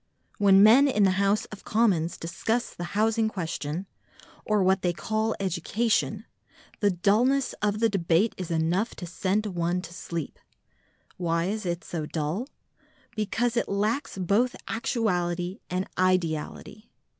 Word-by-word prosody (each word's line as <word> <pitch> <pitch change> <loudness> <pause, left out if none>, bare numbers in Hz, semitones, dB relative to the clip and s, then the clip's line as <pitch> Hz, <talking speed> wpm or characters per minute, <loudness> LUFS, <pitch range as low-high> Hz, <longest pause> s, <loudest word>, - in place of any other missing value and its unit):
When 195 -1 +6
men 245 +7 +7
in 210 -7 +2
the 190 - +5
House 200 +1 +2
of 210 - -10
Commons 200 -8 +1
discuss 225 +8 -2
the 175 +3 -6
Housing 220 +1 +2
Question, 165 -2 -4 0.6
or 210 -2 +2
what 190 +1 +3
they 175 -1 +1
call 220 +4 -1
Education, 210 +3 0 0.5
the 205 - +3
dulness 230 +9 +2
of 210 0 0
the 230 - +4
debate 195 0 +1
is 180 -3 -6
enough 170 +7 0
to 180 - -7
send 190 +4 -1
one 175 -2 -1
to 170 - -9
sleep. 170 -4 -5 0.8
Why 170 -1 0
is 210 +1 -3
it 170 0 -2
so 155 -3 -4
dull? 160 - -2 0.7
Because 230 +3 0
it 235 - 0
lacks 210 +5 -1
both 205 +7 +1
actuality 180 -5 -1
and 185 +1 -2
ideality. 185 +3 -1
195 Hz, 140 wpm, -27 LUFS, 175-220 Hz, 0.8 s, men